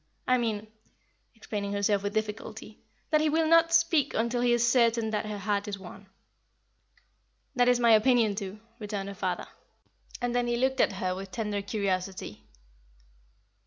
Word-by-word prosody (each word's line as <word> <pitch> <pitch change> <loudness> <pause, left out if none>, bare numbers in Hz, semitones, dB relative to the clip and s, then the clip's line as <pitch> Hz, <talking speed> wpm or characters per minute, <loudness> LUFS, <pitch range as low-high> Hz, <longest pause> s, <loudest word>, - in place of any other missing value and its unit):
I 255 0 +3
mean" 220 -3 -2 0.7
explaining 205 -2 -4
herself 200 0 +1
with 200 0 -4
difficulty 215 0 -5 0.3
"that 305 -1 +4
he 310 - +2
will 320 +1 +2
not 330 +1 +5
speak 330 -4 +3
until 235 +2 0
he 245 0 +3
is 240 0 +3
certain 235 -2 +2
that 215 0 -2
her 210 -1 -4
heart 200 +1 -1
is 200 -1 -4
won." 195 +1 -12 1.5
"That 245 0 +4
is 245 -1 +3
my 235 -1 +4
opinion, 225 -1 +4
too," 200 0 -6 0.2
returned 205 -2 -4
her - - -6
father; 195 - -3 0.7
and 245 -1 -2
then 245 0 +1
he 240 0 0
looked 265 +1 +1
at - - +2
her 185 -1 -2
with 190 +1 -7
tender 210 -1 -3
curiosity. 195 - -3
220 Hz, 165 wpm, -28 LUFS, 200-245 Hz, 1.5 s, not